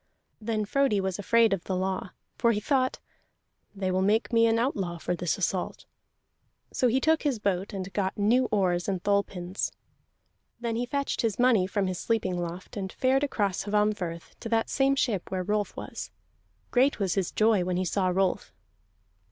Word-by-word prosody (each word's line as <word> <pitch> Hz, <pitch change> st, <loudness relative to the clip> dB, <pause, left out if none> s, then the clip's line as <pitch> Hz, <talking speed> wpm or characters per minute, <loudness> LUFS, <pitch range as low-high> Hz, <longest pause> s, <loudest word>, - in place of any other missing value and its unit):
Then 215 Hz, -1 st, -1 dB
Frodi 270 Hz, -2 st, +2 dB
was 190 Hz, 0 st, -2 dB
afraid 225 Hz, +1 st, +4 dB
of 185 Hz, -3 st, -3 dB
the 190 Hz, -, -2 dB
law, 185 Hz, 0 st, -2 dB, 0.3 s
for 235 Hz, -1 st, +3 dB
he 210 Hz, -, 0 dB
thought: 260 Hz, +3 st, +1 dB, 0.8 s
"They 190 Hz, -1 st, -1 dB
will 185 Hz, +1 st, +1 dB
make 215 Hz, +5 st, +1 dB
me 230 Hz, 0 st, +5 dB
an 225 Hz, 0 st, +3 dB
outlaw 200 Hz, -8 st, -1 dB
for 175 Hz, +2 st, -2 dB
this 175 Hz, -1 st, -1 dB
assault." 185 Hz, -1 st, -2 dB, 0.9 s
So 255 Hz, -, +2 dB
he 250 Hz, +3 st, +2 dB
took 315 Hz, +3 st, +2 dB
his 280 Hz, -5 st, 0 dB
boat, 200 Hz, -1 st, -1 dB
and 195 Hz, -2 st, -5 dB
got 190 Hz, -2 st, -1 dB
new 230 Hz, +5 st, +3 dB
oars 185 Hz, -6 st, +1 dB
and 190 Hz, -3 st, -2 dB
thole 200 Hz, 0 st, +3 dB
pins. 180 Hz, -1 st, -4 dB, 0.9 s
Then 235 Hz, -1 st, -2 dB
he 245 Hz, +2 st, -1 dB
fetched 280 Hz, +2 st, -1 dB
his 225 Hz, -4 st, 0 dB
money 240 Hz, -7 st, +4 dB
from 200 Hz, 0 st, 0 dB
his 185 Hz, -1 st, -3 dB
sleeping 190 Hz, -6 st, 0 dB
loft, 175 Hz, +4 st, -6 dB
and 190 Hz, -1 st, -4 dB
fared 265 Hz, +2 st, +2 dB
across 205 Hz, -10 st, -1 dB
Hvammfirth 205 Hz, -5 st, -1 dB
to 230 Hz, -, -6 dB
that 225 Hz, 0 st, +1 dB
same 275 Hz, 0 st, +3 dB
ship 220 Hz, -9 st, -1 dB
where 185 Hz, -1 st, -2 dB
Rolf 210 Hz, +2 st, -1 dB
was. -, -, -6 dB, 0.6 s
Great 265 Hz, +3 st, +3 dB
was 195 Hz, -4 st, 0 dB
his 190 Hz, -3 st, -1 dB
joy 215 Hz, -3 st, +3 dB
when 180 Hz, 0 st, -1 dB
he 185 Hz, -, 0 dB
saw 185 Hz, +2 st, 0 dB
Rolf. 185 Hz, 0 st, 0 dB
205 Hz, 185 wpm, -28 LUFS, 185-230 Hz, 0.9 s, me